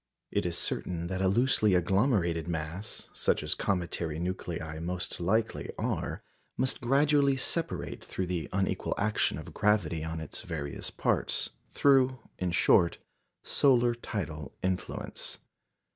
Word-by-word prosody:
It - - +1
is - - -1
certain 85 -1 -1
that 95 0 -2
a 95 - +3
loosely 110 -1 +4
agglomerated 90 - +2
mass 85 +4 -5
(such - - +1
as - - +1
cometary 85 -4 -1
nuclei 85 -3 -4
most 90 +2 -3
likely 110 +6 0
are) - - -2 0.3
must 130 +1 0
gradually 140 +2 +4
separate 165 +5 -2
through 95 - -3
the 85 -4 -3
unequal 95 0 0
action 105 +1 +1
of - - -8
gravity 85 -7 +2
on 80 0 -3
its 80 - -5
various 75 -5 -4
parts - - +1 0.2
through, 130 -2 +4 0.2
in 90 - 0
short, 85 0 +4 0.5
solar 120 -3 +4
tidal 85 -11 -5
influence. 95 -1 -3
95 Hz, 130 wpm, -30 LUFS, 85-120 Hz, 0.5 s, loosely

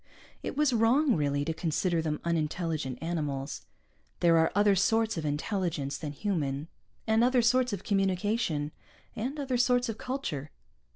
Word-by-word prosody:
It - - -5
was 295 -3 +3
wrong, 240 +4 +4
really, 145 -1 0
to 160 - -1
consider 165 +1 0
them 155 -2 -2
unintelligent 160 -4 -1
animals. 150 -5 -3 0.5
There 165 -1 +5
are 160 - +3
other 205 0 +5
sorts 225 +4 +2
of 160 -3 -3
intelligence 150 -2 -2
than 150 - -4
human, 150 -5 -2 0.4
and 220 +1 +3
other 250 -1 +4
sorts 250 +1 +3
of 200 -1 -4
communication, 195 -5 0 0.4
and 265 +7 -3
other 265 -3 -1
sorts 245 0 +2
of 220 - -5
culture. 180 - -4
180 Hz, 150 wpm, -29 LUFS, 155-230 Hz, 0.5 s, There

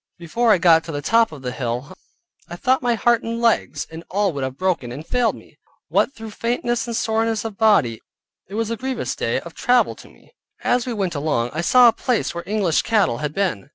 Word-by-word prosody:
Before 220 +8 +1
I 210 - +6
got 165 -2 +5
to 165 - -6
the 145 -1 -4
top 230 +5 +3
of 145 -4 -11
the 125 - -3
hill, 125 +6 -4 0.5
I 175 - -6
thought 260 +8 +1
my 240 -2 +1
heart 235 +2 +2
and 230 0 -4
legs, 230 -1 +1
and 160 +1 -8
all 200 -1 0
would 140 -2 -3
have 130 0 -4
broken, 180 -10 -1
and 145 +6 -8
failed 245 +2 +1
me. - - -17 0.3
What, - - +2
through 225 -4 -9
faintness 240 +3 -1
and 235 - -3
soreness 225 0 0
of 220 -3 -5
body, 195 - +3 0.5
it 195 - -8
was 225 0 -1
a - - 0
grievous 260 +3 -3
day - - -1
of - - -11
travel 250 -1 +2
to - - -14
me. - - -23 0.3
As 245 0 +1
we 245 - -2
went 195 -5 -2
along, 145 -6 -1
I 160 - -2
saw 245 +8 +6
a 230 - +5
place 245 +1 -1
where 170 0 -5
English 200 -6 +1
cattle 205 - +1
had 150 0 -4
been. 185 - -1
205 Hz, 225 wpm, -21 LUFS, 155-230 Hz, 0.5 s, I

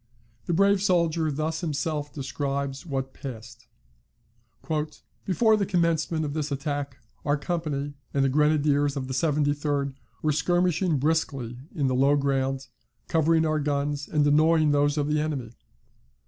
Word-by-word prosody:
The 175 - 0
brave 200 +2 +4
soldier 170 -4 +2
thus 155 +2 -2
himself 150 -2 -2
describes 140 +1 -3
what 135 -2 -3
passed: 120 -4 -9 1.6
"Before 220 +4 +4
the 205 -2 0
commencement 165 -3 +1
of 145 - -3
this 150 -1 -2
attack 140 -1 -3 0.3
our 145 0 +1
company 145 -2 -3 0.2
and 140 -1 +2
the - - +3
Grenadiers 145 0 +2
of 130 -1 -3
the 130 - -4
73d 145 -1 0 0.3
were 155 - +3
skirmishing 175 +1 +1
briskly 135 -5 -1 0.2
in 145 - 0
the 130 - +1
low 135 +3 +4
ground, 135 -1 0 0.4
covering 160 0 +3
our 155 -1 +1
guns, 145 0 -1
and 150 -2 +2
annoying 155 +1 +4
those 145 +1 +2
of 145 -1 +1
the 150 0 +1
enemy. 140 -7 -3
145 Hz, 140 wpm, -26 LUFS, 140-160 Hz, 1.6 s, brave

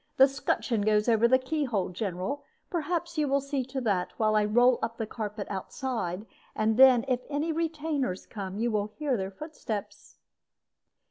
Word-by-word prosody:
The 270 - +8
'scutcheon 265 -4 -1
goes 210 +1 +2
over 230 0 +5
the 260 +2 +5
key 295 +4 -2
hole, 215 -7 -1
General. 190 +9 -3 0.3
Perhaps 340 -1 -2
you 300 - +2
will 280 +1 +2
see 275 -1 -2
to 265 +1 -4
that, 200 -6 0
while 215 -1 +2
I 210 -1 +4
roll 240 +3 +4
up 230 0 -3
the 225 - -2
carpet 210 -2 -5
outside; 200 -2 -3 0.3
and 215 0 +2
then, 255 -1 +7
if 250 -2 +1
any 300 +3 -1
retainers 310 - -2
come, 195 -3 -6
you 235 +2 0
will 210 -1 0
hear 275 +5 -2
their 190 -3 -2
footsteps." 220 -3 -7
240 Hz, 175 wpm, -28 LUFS, 210-280 Hz, 0.3 s, The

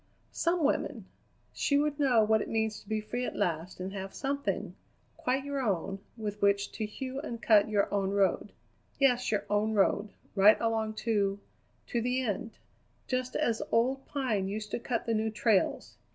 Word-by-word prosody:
Some 340 -1 0
woman! 285 - 0 0.5
She 285 - +2
would 295 0 0
know 250 -6 +4
what 220 0 +3
it - - -5
means 220 -1 0
to 205 - -18
be 220 0 0
free 215 +4 -3
at - - -3
last 170 +2 -2
and 190 +1 -4
have 195 -1 -6
something, 280 0 -2 0.4
quite 265 +2 -1
your 280 -1 -2
own, 195 -4 -1 0.2
with 210 -2 -5
which 200 0 +2
to 215 - -3
hew 260 +4 -5
and 240 -6 -5
cut 215 -2 +5
your 205 -2 +2
own 195 -1 +1
road; 200 -1 +1 0.5
yes, 250 -3 +3
your 210 - 0
own 210 +1 +1
road, 205 +1 +2 0.2
right 210 +2 +6
along 220 -1 0
to 200 -3 +1 0.5
to 235 - -1
the 250 +2 0
end, 225 0 -3 0.5
just 255 0 -2
as 230 -2 +1
old 260 +4 +2
Pine 230 -9 -1
used 210 +1 -5
to - - -1
cut 235 -1 -2
the 230 - 0
new 220 0 +1
trails. 215 -2 +1
220 Hz, 180 wpm, -30 LUFS, 205-250 Hz, 0.5 s, right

